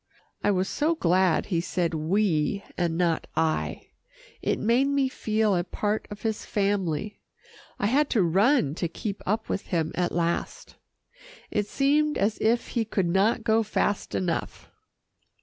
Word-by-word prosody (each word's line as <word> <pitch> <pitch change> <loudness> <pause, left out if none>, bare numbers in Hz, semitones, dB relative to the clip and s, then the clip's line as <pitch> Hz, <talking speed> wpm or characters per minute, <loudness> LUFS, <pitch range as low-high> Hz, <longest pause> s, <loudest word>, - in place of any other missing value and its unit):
I - - +3
was 190 -1 +1
so 310 +3 0
glad 185 - +2
he 170 -4 0
said 175 -1 -1
"we" 170 +2 +1
and 170 -2 -1
not 170 -2 0
"I." 160 -1 -1 0.5
It - - 0
made 240 +5 +2
me 280 -1 +1
feel 215 -4 0
a 175 - +1
part 210 +4 -2
of 205 0 -9
his 220 -1 -2
family. 200 -2 -1 0.6
I - - -1
had 275 +7 +2
to 215 -6 +3
run 190 - +3
to 170 - +1
keep 200 +4 -5
up 220 +3 0
with 195 - -3
him 165 -3 -1
at 180 -1 0
last. 170 0 -2 0.8
It 210 -1 0
seemed 295 +5 +2
as 205 +2 0
if 230 +2 +1
he 235 - 0
could 195 -5 -1
not 205 +6 +2
go 225 0 +3
fast 205 -1 -1
enough. 175 -3 -3
205 Hz, 155 wpm, -26 LUFS, 175-225 Hz, 0.8 s, I